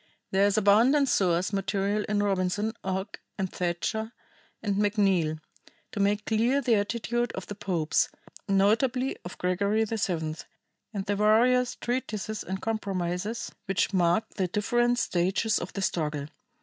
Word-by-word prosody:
There 195 +1 +4
is 205 +1 +1
abundant 235 +8 +4
source 180 -2 +2
material 200 +1 0
in 205 -1 +1
Robinson, 200 +2 0
Ogg, 190 +2 -3 0.2
and 190 -2 -3
Thatcher 220 +6 -2 0.5
and 205 -2 0
McNeal 195 -7 +2 0.5
to - - -5
make 205 +1 +1
clear 235 +5 +2
the 255 -4 +2
attitude 235 +3 0
of - - -6
the - - -6
popes, 175 -6 0 0.4
notably 230 +7 +2
of 175 - -8
Gregory 200 +4 +1
VII 175 -8 -2 0.5
and 200 -3 -4
the 205 -1 0
various 240 +4 +3
treaties 220 -4 -3
and 190 +1 -4
compromises 200 -1 -2
which 195 +1 0
mark 175 +2 +2
the 190 -2 +1
different 240 +6 +1
stages 195 +1 +1
of 175 - -6
the 195 - -3
struggle. 150 -5 -1
205 Hz, 135 wpm, -27 LUFS, 185-220 Hz, 0.5 s, There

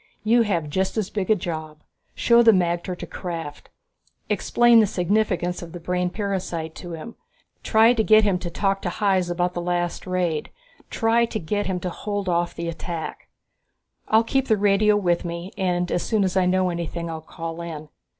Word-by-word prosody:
"You 235 +2 +4
have 175 -8 0
just 190 +8 -1
as 210 -2 -1
big 200 -3 -3
a 215 - +6
job. 155 -4 -6 0.3
Show 235 0 +5
the 230 -1 +7
magter 175 -1 0
to - - -6
Krafft, 165 -5 -6 0.6
explain 240 -1 +4
the 215 - +4
significance 180 -1 0
of 170 -1 -9
the 175 - -6
brain 180 +1 -1
parasite 180 -5 -3
to 175 -2 -7
him. 165 +9 -8 0.4
Try 225 +2 +5
to 225 -2 +1
get 215 0 +6
him 195 -3 +1
to 180 - -5
talk 195 +3 -1
to 180 - -2
Hys 190 -1 +1
about 175 +1 0
the 175 - -3
last 175 +1 -2
raid. 175 -4 -1 0.4
Try 230 +1 +2
to 220 - -3
get 205 +4 -2
him 185 -1 -1
to 180 - -3
hold 205 +1 -4
off 175 -1 0
the 170 0 -4
attack. 170 0 -5 0.8
I'll 220 +1 +4
keep 270 +3 0
the 220 - +3
radio 205 +1 +3
with 175 -4 +1
me 170 +2 -5
and 180 -2 -1
as 175 - 0
soon 215 -3 +1
as 190 -1 -1
I 185 -1 +3
know 185 0 +2
anything 170 0 -4
I'll 160 -1 -5
call 165 +1 -7
in. 155 -3 -7
180 Hz, 190 wpm, -23 LUFS, 170-205 Hz, 0.8 s, the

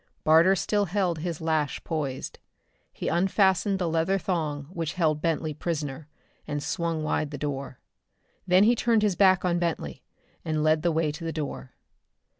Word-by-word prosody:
Barter 165 +5 +5
still 205 +2 0
held 180 -3 -1
his 165 -1 -4
lash 155 -3 -1
poised. 145 -5 -4 0.5
He - - -6
unfastened 190 +2 +2
the 180 -2 -1
leather 165 +4 +1
thong 155 -5 -2
which 170 -2 -3
held 155 -5 +1
Bentley 160 -1 -1
prisoner 150 -2 -4 0.4
and 145 -1 -3
swung 165 -2 -2
wide 150 -1 -1
the 145 - -6
door. 135 -2 -5 0.7
Then 185 +2 +5
he 230 +3 +5
turned 230 -2 +2
his 205 -4 +2
back 185 -2 +4
on 175 -1 +1
Bentley 160 - -3 0.4
and 155 -1 -1
led 155 0 +3
the 170 +1 +1
way 160 -1 +1
to 150 +3 -9
the 165 - -2
door. 145 - -5
165 Hz, 165 wpm, -26 LUFS, 150-185 Hz, 0.7 s, Barter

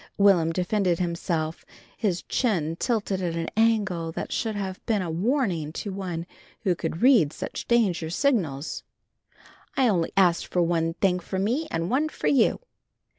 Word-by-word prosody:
Will'm 190 -5 +4
defended 180 0 +1
himself, 170 -2 -2 0.3
his 195 -5 -1
chin 170 - 0
tilted 205 -5 -1
at 170 -2 -2
an 165 0 -3
angle 210 -7 +1
that - - -5
should 220 -2 -1
have 190 -2 -4
been 210 -4 +1
a 170 - -3
warning 180 - 0
to 200 +3 -5
one 180 -4 -4 0.4
who 190 -5 +2
could 165 +2 -4
read 235 - +6
such - - -6
danger 195 -9 +2
signals. 170 - 0 1.0
"I 265 -2 +4
only 175 -7 +1
asked 180 -3 +3
for 180 - +1
one 165 -1 0
thing 180 -2 +2
for 190 +2 -5
me 240 +12 0
and 165 +4 -2
one 295 +5 +2
for - - -7
you." 265 - +3
185 Hz, 160 wpm, -26 LUFS, 165-220 Hz, 1.0 s, read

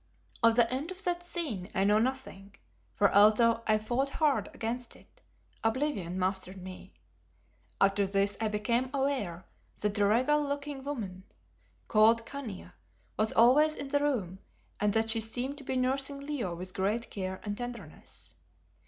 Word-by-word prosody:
Of 230 0 +5
the 235 -1 +5
end 280 +6 -3
of 375 +1 -5
that 350 -1 0
scene 300 - -3
I 190 - +2
know 210 +2 +4
nothing, 225 -6 -3 0.4
for 205 - +3
although 220 +3 +5
I 215 -1 +4
fought 240 +6 -1
hard 300 0 +1
against 240 -2 -4
it, - - -21 0.4
oblivion 225 - -1
mastered 190 0 -1
me. 185 - -10 0.8
After 195 0 +3
this 200 +1 +1
I 220 - +2
became 235 +4 0
aware 255 -11 -1 0.3
that 210 -1 0
the 205 -1 +2
regal 255 +8 +3
looking 285 -1 -4
woman 210 -10 -5 0.6
called 225 +1 +4
Khania, 220 - -7 0.4
was 215 +1 +1
always 290 +7 +5
in 280 - -5
the 285 +1 +2
room, 220 -11 -1 0.4
and 210 0 +2
that 225 0 +2
she 225 0 0
seemed 250 +6 -3
to - - -9
be 260 - -3
nursing 270 +2 0
Leo 280 -11 -3
with 180 +2 -6
great 205 +5 -1
care 190 -1 -4
and 205 -1 -3
tenderness. 235 -8 -7
225 Hz, 155 wpm, -30 LUFS, 200-275 Hz, 0.8 s, Of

